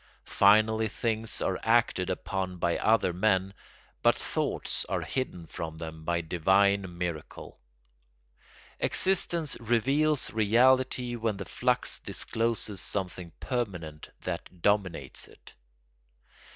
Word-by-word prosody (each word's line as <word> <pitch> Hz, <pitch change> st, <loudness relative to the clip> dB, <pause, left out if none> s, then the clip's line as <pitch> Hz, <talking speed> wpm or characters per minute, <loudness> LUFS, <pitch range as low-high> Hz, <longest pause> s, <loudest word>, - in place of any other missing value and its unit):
Finally 110 Hz, +2 st, +4 dB
things 110 Hz, +1 st, -2 dB
are 95 Hz, -, -1 dB
acted 115 Hz, -5 st, +2 dB
upon 95 Hz, 0 st, -3 dB
by 85 Hz, -1 st, 0 dB
other 110 Hz, -5 st, +2 dB
men, 95 Hz, 0 st, +1 dB, 0.5 s
but -, -, +4 dB
thoughts -, -, -1 dB
are -, -, -2 dB
hidden 90 Hz, -10 st, -4 dB
from 80 Hz, 0 st, -7 dB
them 80 Hz, 0 st, -8 dB
by 85 Hz, +1 st, 0 dB
divine 95 Hz, +2 st, +2 dB
miracle. 85 Hz, -4 st, -6 dB, 1.2 s
Existence 170 Hz, -5 st, +2 dB
reveals 135 Hz, +6 st, +1 dB
reality 125 Hz, +3 st, +3 dB
when 110 Hz, -3 st, -2 dB
the 100 Hz, -, -6 dB
flux -, -, +1 dB
discloses 110 Hz, -4 st, -1 dB
something 90 Hz, -1 st, -2 dB
permanent 90 Hz, -, -4 dB
that 90 Hz, -2 st, -6 dB
dominates 100 Hz, -4 st, 0 dB
it. -, -, -17 dB
100 Hz, 105 wpm, -28 LUFS, 90-115 Hz, 1.2 s, Finally